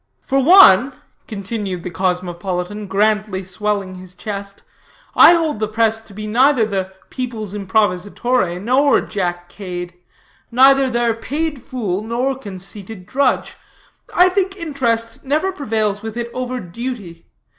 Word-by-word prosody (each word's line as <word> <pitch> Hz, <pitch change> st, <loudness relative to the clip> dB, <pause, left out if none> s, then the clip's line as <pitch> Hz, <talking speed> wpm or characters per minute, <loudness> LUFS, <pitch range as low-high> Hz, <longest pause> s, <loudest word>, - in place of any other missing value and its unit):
"For 275 Hz, -, +1 dB
one," 270 Hz, -, +7 dB, 0.3 s
continued 200 Hz, -3 st, -5 dB
the 180 Hz, -, -5 dB
cosmopolitan, 180 Hz, +2 st, -3 dB
grandly 210 Hz, 0 st, 0 dB
swelling 195 Hz, +1 st, -2 dB
his 185 Hz, 0 st, -11 dB
chest, 200 Hz, 0 st, -7 dB, 0.5 s
"I -, -, +8 dB
hold 320 Hz, -8 st, 0 dB
the 215 Hz, -, 0 dB
press 220 Hz, +1 st, +1 dB
to 220 Hz, -3 st, -15 dB
be 215 Hz, +1 st, -6 dB
neither 245 Hz, +2 st, +3 dB
the 190 Hz, -3 st, -3 dB, 0.2 s
people's 230 Hz, -6 st, -5 dB
improvisatore, 205 Hz, 0 st, 0 dB
nor 260 Hz, +7 st, +3 dB
Jack 175 Hz, -4 st, -3 dB
Cade; 175 Hz, -2 st, -7 dB, 0.6 s
neither 270 Hz, +2 st, +5 dB
their 240 Hz, -1 st, +1 dB
paid 290 Hz, +5 st, -3 dB
fool, 210 Hz, -8 st, -3 dB
nor 240 Hz, +5 st, -1 dB
conceited 200 Hz, -3 st, -7 dB
drudge. 265 Hz, +5 st, 0 dB, 0.5 s
I 360 Hz, +1 st, +5 dB
think 385 Hz, +1 st, -1 dB
interest 240 Hz, -8 st, -2 dB
never 305 Hz, +8 st, 0 dB
prevails 215 Hz, -, -1 dB
with 220 Hz, +1 st, -6 dB
it 235 Hz, 0 st, -4 dB
over 255 Hz, 0 st, -3 dB
duty. 195 Hz, -4 st, -7 dB
215 Hz, 130 wpm, -19 LUFS, 190-255 Hz, 0.6 s, I